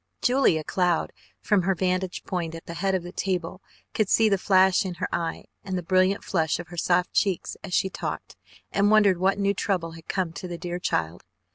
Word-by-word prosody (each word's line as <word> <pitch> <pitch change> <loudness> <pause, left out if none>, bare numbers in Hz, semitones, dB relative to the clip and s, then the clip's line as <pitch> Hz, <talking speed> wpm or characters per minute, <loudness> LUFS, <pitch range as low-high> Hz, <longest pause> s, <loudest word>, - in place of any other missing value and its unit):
Julia 245 - +3
Cloud, 175 0 0 0.3
from 210 -4 +2
her 190 +2 +1
vantage 185 0 -1
point 170 -3 -3
at 165 - -10
the 170 - -7
head 190 +3 0
of 185 - -2
the 175 - -8
table, 185 -1 -3 0.3
could 215 -3 0
see 225 -1 +4
the 195 -2 +2
flash 190 +2 +4
in 185 -2 -4
her - - -2
eye 170 -1 -2 0.2
and 190 -2 -3
the 180 - -4
brilliant 185 +2 +2
flush 160 -4 0
of 175 - -8
the 175 - -10
soft 180 +2 +1
cheeks 195 -5 0
as 180 - -3
she - - +2
talked - - -5 0.4
and 200 +1 +3
wondered 205 -4 +5
what 190 +2 +2
new 200 0 +1
trouble 185 -4 -1
had 165 0 -13
come 180 -4 -2
to 185 - -7
the 175 -1 -5
dear 175 +1 -4
child. 85 - -2
185 Hz, 215 wpm, -25 LUFS, 170-195 Hz, 0.4 s, wondered